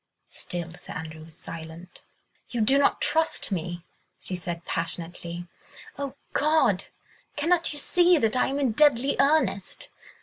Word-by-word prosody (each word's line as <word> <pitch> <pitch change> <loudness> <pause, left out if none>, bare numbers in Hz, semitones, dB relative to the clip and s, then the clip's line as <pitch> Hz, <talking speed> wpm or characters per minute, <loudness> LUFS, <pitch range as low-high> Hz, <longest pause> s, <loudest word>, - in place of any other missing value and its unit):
Still 170 -1 -5
Sir - - -9
Andrew 160 -2 -7
was 160 0 -15
silent. 165 +2 -9 0.4
"You 240 -2 -1
do 270 +6 +5
not 280 - +3
trust 320 -8 +1
me," 175 -1 -3 0.3
she - - -4
said 175 -1 -5
passionately. 170 +1 -4 0.5
"Oh, 280 -1 -4 0.2
God! 310 +2 +3 0.5
cannot 335 +3 +2
you 295 - -4
see 350 +4 +4
that 225 -5 +1
I 250 - +3
am 275 - -1
in 265 -4 +2
deadly 275 +1 +4
earnest? 275 -9 +1
215 Hz, 140 wpm, -26 LUFS, 170-285 Hz, 0.5 s, do